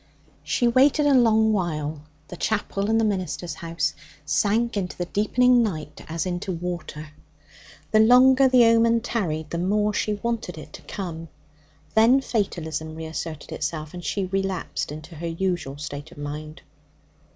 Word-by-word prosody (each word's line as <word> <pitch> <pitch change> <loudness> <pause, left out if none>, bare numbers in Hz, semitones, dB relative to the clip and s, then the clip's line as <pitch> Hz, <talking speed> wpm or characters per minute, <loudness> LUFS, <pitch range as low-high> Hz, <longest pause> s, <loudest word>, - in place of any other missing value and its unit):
She 240 - +1
waited 275 +5 +4
a 290 - +4
long 220 -3 +4
while. 155 -6 -2 0.3
The - - -7
chapel 200 +1 -1
and 225 0 +3
the 225 - +2
minister's 180 -5 -2
house 165 -1 -2 0.3
sank 215 +9 +1
into 185 -3 -3
the 175 - -2
deepening 245 +6 +3
night 170 -9 -3
as 165 +1 -2
into 180 +1 -3
water. 170 -3 -5 0.8
The 215 - +5
longer 255 +4 +6
the 250 -2 +6
omen 230 0 +4
tarried, 160 -10 -2
the 170 - -2
more 210 +3 +1
she 210 0 0
wanted 220 -5 -3
it 150 -1 -11
to - - -10
come. 165 -5 -6 0.7
Then 230 +5 +5
fatalism 160 - -3
reasserted 160 -1 -6
itself, 155 -2 -4
and 175 -1 -8
she 195 +1 -1
relapsed 195 -4 -2
into 155 +3 -9
her 170 +2 -4
usual 165 -5 -2
state 145 0 -7
of - - -15
mind. 150 +1 -7
185 Hz, 150 wpm, -24 LUFS, 160-225 Hz, 0.8 s, longer